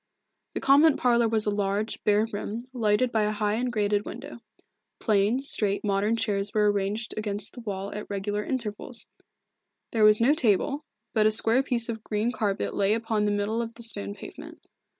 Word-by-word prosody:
The -, -, -1 dB
convent 285 Hz, +3 st, +5 dB
parlour 235 Hz, -2 st, +3 dB
was 220 Hz, -1 st, +2 dB
a 210 Hz, -, +1 dB
large, 205 Hz, +1 st, -2 dB
bare 210 Hz, +1 st, +3 dB
room, 220 Hz, +4 st, -5 dB
lighted 235 Hz, +1 st, +1 dB
by 220 Hz, -, +1 dB
a 210 Hz, 0 st, +1 dB
high 210 Hz, 0 st, -1 dB
and 245 Hz, +3 st, -1 dB
grated 205 Hz, -2 st, 0 dB
window. -, -, -8 dB, 0.6 s
Plain, 215 Hz, +4 st, +1 dB
straight, 205 Hz, -7 st, +1 dB
modern 205 Hz, +2 st, +1 dB
chairs 205 Hz, -3 st, -2 dB
were 210 Hz, -1 st, +4 dB
ranged 205 Hz, +3 st, -2 dB
against 205 Hz, -1 st, -2 dB
the -, -, -10 dB
wall 200 Hz, -3 st, -5 dB
at 210 Hz, -, -7 dB
regular 205 Hz, +1 st, -2 dB
intervals. 235 Hz, -1 st, -4 dB, 0.9 s
There 225 Hz, -2 st, +1 dB
was 215 Hz, 0 st, +7 dB
no 245 Hz, +5 st, +4 dB
table, 275 Hz, +3 st, +1 dB, 0.3 s
but 215 Hz, -2 st, +4 dB
a -, -, +3 dB
square 225 Hz, +3 st, +4 dB
piece 245 Hz, -4 st, -1 dB
of 220 Hz, -2 st, -5 dB
green 215 Hz, +3 st, -1 dB
carpet 205 Hz, -5 st, -2 dB
lay 200 Hz, +2 st, +2 dB
upon 225 Hz, -2 st, -1 dB
the 205 Hz, -, +1 dB
middle 205 Hz, +3 st, -1 dB
of 230 Hz, 0 st, -6 dB
the 235 Hz, -, -5 dB
stone 100 Hz, -, -3 dB
pavement. -, -, -11 dB
215 Hz, 185 wpm, -26 LUFS, 205-230 Hz, 0.9 s, was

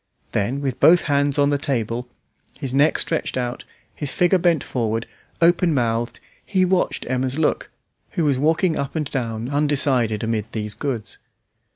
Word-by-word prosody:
Then, 125 Hz, +8 st, -1 dB
with 135 Hz, -3 st, -3 dB
both 175 Hz, +1 st, +6 dB
hands 145 Hz, -1 st, +1 dB
on 145 Hz, 0 st, +3 dB
the 145 Hz, -, +1 dB
table, 125 Hz, -4 st, -2 dB, 0.5 s
his 135 Hz, -3 st, -5 dB
neck 145 Hz, +3 st, +3 dB
stretched 160 Hz, -5 st, -1 dB
out, 125 Hz, 0 st, -3 dB, 0.3 s
his 145 Hz, -2 st, -4 dB
figure 180 Hz, +1 st, +3 dB
bent 170 Hz, -4 st, +2 dB
forward, 115 Hz, -2 st, -2 dB, 0.4 s
open 170 Hz, -1 st, +4 dB
mouthed, 115 Hz, -1 st, -1 dB, 0.2 s
he 185 Hz, -2 st, +1 dB
watched 185 Hz, 0 st, 0 dB
Emma's 130 Hz, +2 st, -1 dB
look, 160 Hz, -, 0 dB, 0.4 s
who 165 Hz, -, 0 dB
was 140 Hz, -3 st, +2 dB
walking 160 Hz, +3 st, +2 dB
up 140 Hz, +2 st, -4 dB
and 155 Hz, -2 st, -1 dB
down 115 Hz, -3 st, -3 dB
undecided 140 Hz, -7 st, +2 dB
amid 110 Hz, -1 st, -2 dB
these 105 Hz, -1 st, -1 dB
goods. 125 Hz, -5 st, -4 dB
135 Hz, 160 wpm, -22 LUFS, 120-155 Hz, 0.5 s, both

